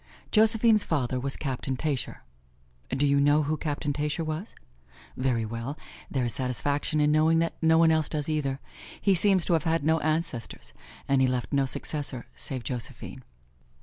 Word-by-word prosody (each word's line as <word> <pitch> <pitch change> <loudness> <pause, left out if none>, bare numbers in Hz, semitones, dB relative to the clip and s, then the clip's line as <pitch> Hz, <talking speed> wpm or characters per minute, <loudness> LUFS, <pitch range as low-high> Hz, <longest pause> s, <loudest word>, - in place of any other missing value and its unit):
Josephine's 220 0 +4
father 130 -5 -1
was 135 +1 -1
Captain 130 -1 -3
Tascher. 145 -2 -3 0.7
Do 135 +3 +1
you 140 0 +3
know 145 +2 +4
who 150 +2 -1
Captain 150 -1 -2
Tascher 150 +3 -2
was? 155 +6 -5 0.6
Very 125 -3 0
well, 115 +6 -5 0.3
there 130 -3 -1
is 120 - -1
satisfaction 140 +4 -1
then 150 0 +3
in - - +3
knowing 155 +2 +4
that 165 0 +1
no 160 0 +4
one 165 0 +5
else 160 -1 +1
does 150 -2 -3
either. 140 -4 -1 0.4
He 200 - +3
seems 190 -1 +4
to 175 - +1
have 160 -1 +1
had 165 -1 +1
no 160 +2 +2
ancestors; 155 -5 -3 0.3
and 135 -1 +3
he 130 - +4
left 125 +2 -2
no 140 -1 +2
successor 140 -2 -2
save 130 -3 -5
Josephine. 125 -2 -5
150 Hz, 175 wpm, -27 LUFS, 130-160 Hz, 0.7 s, one